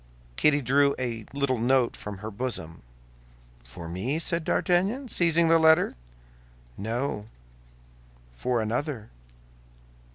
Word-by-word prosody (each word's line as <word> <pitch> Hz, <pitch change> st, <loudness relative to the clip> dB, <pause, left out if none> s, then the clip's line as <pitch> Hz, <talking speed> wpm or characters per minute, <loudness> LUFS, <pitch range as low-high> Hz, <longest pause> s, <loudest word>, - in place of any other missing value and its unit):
Kitty 145 Hz, -, +3 dB
drew 140 Hz, +3 st, +3 dB
a 115 Hz, -4 st, -4 dB
little 140 Hz, -3 st, 0 dB
note 125 Hz, +1 st, +2 dB
from 105 Hz, -1 st, -7 dB
her 110 Hz, -, -4 dB
bosom. 100 Hz, -8 st, -5 dB, 0.8 s
"For 80 Hz, +8 st, -8 dB
me?" 95 Hz, -, -2 dB
said 170 Hz, +1 st, 0 dB
D'Artagnan, 200 Hz, -, +1 dB
seizing 170 Hz, -3 st, +3 dB
the 165 Hz, 0 st, +5 dB
letter. 160 Hz, +2 st, +5 dB, 0.8 s
"No; 115 Hz, +1 st, -3 dB, 1.1 s
for 115 Hz, -, -1 dB
another." 115 Hz, 0 st, -3 dB
130 Hz, 105 wpm, -27 LUFS, 110-160 Hz, 1.1 s, the